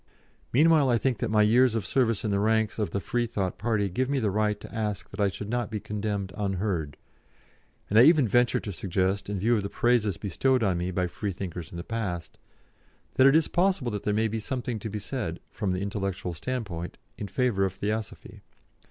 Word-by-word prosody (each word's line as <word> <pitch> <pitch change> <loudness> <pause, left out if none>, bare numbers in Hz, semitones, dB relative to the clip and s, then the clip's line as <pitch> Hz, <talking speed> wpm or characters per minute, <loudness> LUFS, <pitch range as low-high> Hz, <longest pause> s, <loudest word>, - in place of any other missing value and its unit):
Meanwhile 150 0 +5
I 120 - +4
think 125 -2 0
that 120 - -1
my 105 0 +4
years 120 +2 +4
of 110 -4 -1
service 115 +1 +1
in 105 - 0
the 100 - +1
ranks 110 +1 +1
of 105 - 0
the 100 - -2
Freethought 110 -4 -2
party 110 -2 +1
give 125 +8 -1
me 140 - +1
the 110 -6 +1
right 105 0 0
to - - -11
ask 105 -3 -2
that - - -10
I 100 -1 +3
should 100 +2 -6
not 120 0 -1
be 110 -2 -3
condemned 100 -2 -3
unheard, 95 -7 -2 0.9
and 105 - +4
I - - +9
even 155 -5 +6
venture 120 +3 +3
to 100 - -5
suggest, 95 +2 -1
in 105 - -2
view 115 +6 +2
of 105 - +1
the 100 - -4
praises 115 -6 +2
bestowed 125 +6 +1
on 95 -4 +1
me 90 +1 -2
by 90 0 0
Freethinkers 90 -3 -5
in 85 - -9
the 85 - -5
past, 95 -6 -4 0.7
that 130 - +6
it 135 - +5
is 160 -1 +4
possible 175 -9 +1
that 105 -1 -3
there 105 - -1
may 110 +2 +2
be 110 +1 -3
something 120 0 -3
to 110 - -5
be 105 - -4
said, 100 -7 -4
from 100 -4 -2
the 90 0 -1
intellectual 100 -3 -3
standpoint, 90 -3 -4 0.2
in 105 - -4
favour 100 0 +1
of 95 -1 0
Theosophy. 105 +2 -4
105 Hz, 215 wpm, -27 LUFS, 95-120 Hz, 0.9 s, I